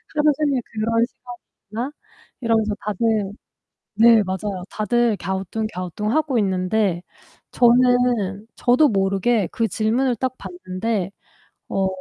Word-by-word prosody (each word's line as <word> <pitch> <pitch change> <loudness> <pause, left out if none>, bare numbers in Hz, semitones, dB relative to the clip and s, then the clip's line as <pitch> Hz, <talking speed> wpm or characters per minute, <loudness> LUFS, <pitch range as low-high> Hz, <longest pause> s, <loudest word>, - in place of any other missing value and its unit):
'하루 300 0 +4
종일 285 -5 +1
그런 230 +1 0
시간이 245 -1 -12 0.3
있나?' 240 +6 -3 0.5
이러면서 220 -3 +1
다들 210 -1 0 0.6
네, 225 -1 +6
맞아요. 190 0 -4
다들 230 +1 +1
갸우뚱갸우뚱하고 210 - -2
있는데 190 -1 0 0.5
저는 240 -4 +3
저도 255 +5 +4
모르게 195 +1 +1
그 230 -1 0
질문을 235 +4 0
딱 255 +1 -2
받는데. 200 - -3 0.6
어, 195 -1 +1
220 Hz, 250 characters per minute, -22 LUFS, 195-245 Hz, 0.6 s, 네